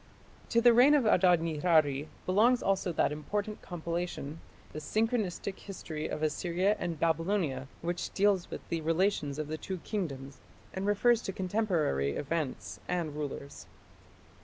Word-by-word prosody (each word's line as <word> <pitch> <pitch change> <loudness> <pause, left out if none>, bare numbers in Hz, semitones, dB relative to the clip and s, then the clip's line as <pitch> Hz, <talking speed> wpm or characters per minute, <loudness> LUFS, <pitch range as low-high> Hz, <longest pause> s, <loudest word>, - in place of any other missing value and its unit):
To 235 - +3
the 240 0 +7
reign 260 +5 +7
of 275 -5 +3
Adad 180 -5 +5
nirari 155 -3 +2 0.2
belongs 225 +7 +4
also 195 -2 +1
that 155 - +1
important 205 +8 -3
compilation 170 -3 -4 0.3
the 155 - -4
"Synchronistic 210 +2 -1
History 160 -6 -6
of 155 - -4
Assyria 175 +6 +1
and 170 -3 -3
Babylonia", 165 -5 0 0.2
which 175 +1 -2
deals 200 -3 +2
with - - -8
the 165 -1 -1
relations 160 -3 +1
of 155 -1 -3
the 155 +1 -4
two 190 - -4
kingdoms 140 -10 -4 0.3
and 190 +1 -3
refers 230 +3 +3
to 195 - -4
contemporary 180 - 0
events 130 - -3
and 170 -4 -2
rulers. 140 -1 -6
175 Hz, 140 wpm, -31 LUFS, 150-200 Hz, 0.3 s, the